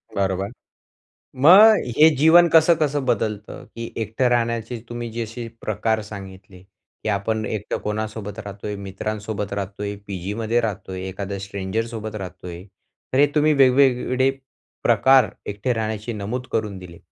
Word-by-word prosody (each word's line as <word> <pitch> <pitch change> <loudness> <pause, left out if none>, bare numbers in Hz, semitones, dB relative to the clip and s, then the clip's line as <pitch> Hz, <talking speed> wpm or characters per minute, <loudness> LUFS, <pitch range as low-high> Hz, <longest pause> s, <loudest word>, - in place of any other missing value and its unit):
बरोबर. 95 +1 -1 0.8
मग 195 +11 +8 0.2
हे 155 +1 +8
जीवन 160 +5 +6
कसं, 165 +1 +6
कसं 145 -2 0
बदलतं? 110 -3 -2
की 115 0 -8
एकटे 110 +4 0
राहण्याचे 115 -1 -1
तुम्ही 120 0 -5
जसे 115 +1 -5
प्रकार 110 +1 -1
सांगितले, 95 -3 -11
की 95 +2 -10
आपण 110 +2 -1
एकटं 105 -2 -3
कोणासोबत 105 0 -4
राहतोय, 105 0 -6
मित्रांसोबत 100 +1 -5
राहतोय, 100 +1 -4
पीजीमध्ये 105 +5 -2
राहतोय, 95 -4 -4
एखादा 100 +1 -5
स्ट्रेंजरसोबत 110 +3 -4
राहतोय? 90 -3 -8 0.5
तर 130 - +2
हे 145 - +7
तुम्ही 155 0 +4
वेगवेगळे 130 -1 +3 0.5
प्रकार 130 -5 +5 0.2
एकटे 105 +5 -1
राहण्याची 110 +1 -3
नमूद 110 +5 -4
करून 105 -3 -2
दिले. 90 -2 -11
110 Hz, 125 wpm, -22 LUFS, 100-120 Hz, 0.8 s, मग